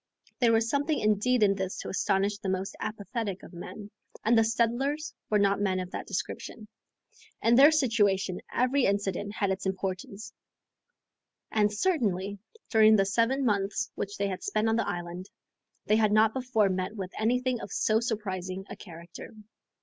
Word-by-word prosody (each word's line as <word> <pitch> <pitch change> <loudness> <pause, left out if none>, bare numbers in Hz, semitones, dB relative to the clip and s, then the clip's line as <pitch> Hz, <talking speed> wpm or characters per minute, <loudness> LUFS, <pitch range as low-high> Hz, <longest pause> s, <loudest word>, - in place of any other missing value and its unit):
There 240 -3 +4
was 225 0 +3
something 285 +4 0
indeed 215 +3 +2
in 200 -1 +5
this 190 -1 -4
to - - -6
astonish 200 +1 0
the 195 - -3
most 190 +1 -2
apathetic 215 -2 -4
of - - -12
men, 205 +4 -9 0.3
and 230 +2 +4
the 225 - +5
settlers 240 +7 0 0.2
were 210 - +3
not 200 0 +2
men 190 -2 +1
of 185 0 -5
that - - -6
description. 210 +2 -5 0.8
In 230 - +4
their 275 +5 +8
situation 205 - +1
every 255 +2 +2
incident 200 0 -1
had 200 -3 0
its 190 0 -2
importance, 190 +2 -4 1.2
and, 210 -1 +2
certainly, 205 - 0 0.3
during 220 -1 +6
the 195 -2 +3
seven 235 +7 +1
months 205 -1 0
which 205 +1 -5
they 200 - 0
had 185 -2 -4
spent 215 +1 0
on 225 - +2
the 230 - 0
island, 175 +2 -5 0.6
they 215 - +3
had 215 -2 +3
not 215 +1 +4
before 250 -6 +1
met 185 +3 -2
with 190 -3 -5
anything 250 +2 +1
of - - -8
so 215 0 +2
surprising 195 -5 -3
a - - -5
character. 170 +3 -11
210 Hz, 165 wpm, -28 LUFS, 195-230 Hz, 1.2 s, their